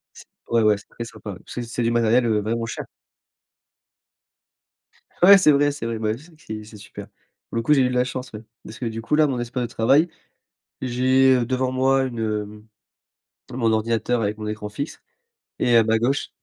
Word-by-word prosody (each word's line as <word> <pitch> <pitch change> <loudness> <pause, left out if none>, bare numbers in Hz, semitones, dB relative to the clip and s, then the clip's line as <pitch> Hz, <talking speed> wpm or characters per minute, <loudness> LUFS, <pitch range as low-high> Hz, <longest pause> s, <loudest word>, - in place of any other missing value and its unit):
C - - -13 0.2
ouais 115 -1 +2
ouais, 105 -1 +4
c'est - - -18
très 115 - -7
sympa, 110 -2 -9
ouais, 90 - -10
parce - - -10
que 125 - -3
c'est 120 +1 -4
du 115 - +1
matériel, 120 +1 +3
heu, 110 -2 +1
vraiment 115 +2 -2
cher! - - -5 2.4
Ouais 195 +2 +9
c'est 155 -6 +5
vrai, 145 +1 +3
c'est 140 -5 -5
vrai, 115 -1 -3
beh, 110 -1 0
ouais 115 - -6
c'est 165 +4 -17
c'est 110 -7 -8
c'est 110 +1 -13
super. 105 - -10 0.4
Pour - - -7
le 115 - 0
coup, 150 +5 +4
j'ai 135 - +4
eu 125 - +2
de - - -3
la 125 0 +2
chance, 125 0 -6
ouais, 105 0 -8 0.2
parce 110 - -10
que 125 - -4
du 115 0 -4
coup, 150 - -1
là, 155 0 +5
mon 135 -3 -2
espace 120 +1 -3
de - - -1
travail. 140 +9 +3 0.7
J'ai, 130 +1 +3
heu, 120 -2 0
devant 130 0 -1
moi 135 +1 +2
une 120 -3 -5
hem, 105 -1 -4 0.9
mon 115 -2 0
ordinateur 115 +2 0
avec 105 +1 -2
mon 105 - -6
écran 105 -1 -5
fixe 140 +9 -6 0.6
et 120 -1 +4
à 115 - +6
ma 110 0 +1
gauche, 135 +5 0
115 Hz, 220 wpm, -22 LUFS, 110-130 Hz, 2.4 s, Ouais